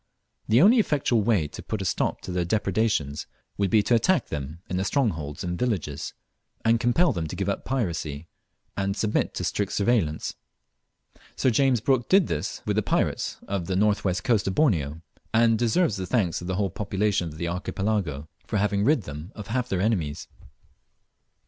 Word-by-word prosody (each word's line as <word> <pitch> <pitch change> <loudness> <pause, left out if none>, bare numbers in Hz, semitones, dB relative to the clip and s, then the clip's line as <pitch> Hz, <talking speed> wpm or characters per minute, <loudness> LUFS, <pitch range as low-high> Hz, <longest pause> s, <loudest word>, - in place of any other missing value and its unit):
The 115 +7 +5
only 230 +5 +7
effectual 140 - +2
way 100 -8 +2
to - - -8
put - - -4
a - - -3
stop - - 0
to - - -6
their 90 -1 0
depredations 95 -6 0 0.3
would 100 -1 +2
be 105 +2 +4
to 120 - +1
attack 155 +10 +2
them 75 +1 -5
in 90 - -2
their 95 - 0
strongholds 85 - -1
and 90 -1 -3
villages, 90 - -2 0.5
and 115 0 +4
compel 125 +7 +3
them 85 -5 -3
to 85 - -6
give 100 +1 -2
up 100 - -2
piracy, 85 - -2 0.5
and 100 0 -1
submit 105 -1 0
to - - -3
strict 100 -1 -1
surveillance. 100 -8 +1 1.0
Sir 130 - +2
James 130 -1 +3
Brooke 130 -1 +1
did 190 -2 +6
this - - -3
with - - 0
the - - +4
pirates - - 0
of 95 -3 -2
the 95 - -1
north 105 +2 +2
west 95 0 0
coast 110 -6 +2
of 95 - -1
Borneo, 80 - +1 0.3
and 115 -1 +4
deserves 120 - +2
the 95 -1 -4
thanks 100 -11 0
of 85 - -6
the 95 - -1
whole 100 -1 0
population 100 -2 0
of 75 - -11
the 85 - -2
Archipelago 90 -4 -2 0.2
for - - -1
having 100 0 +1
rid 140 -2 +3
them 75 +4 -8
of 105 -3 -8
half 125 +2 -1
their 95 -1 0
enemies. 90 -9 -1
100 Hz, 185 wpm, -26 LUFS, 85-115 Hz, 1.0 s, only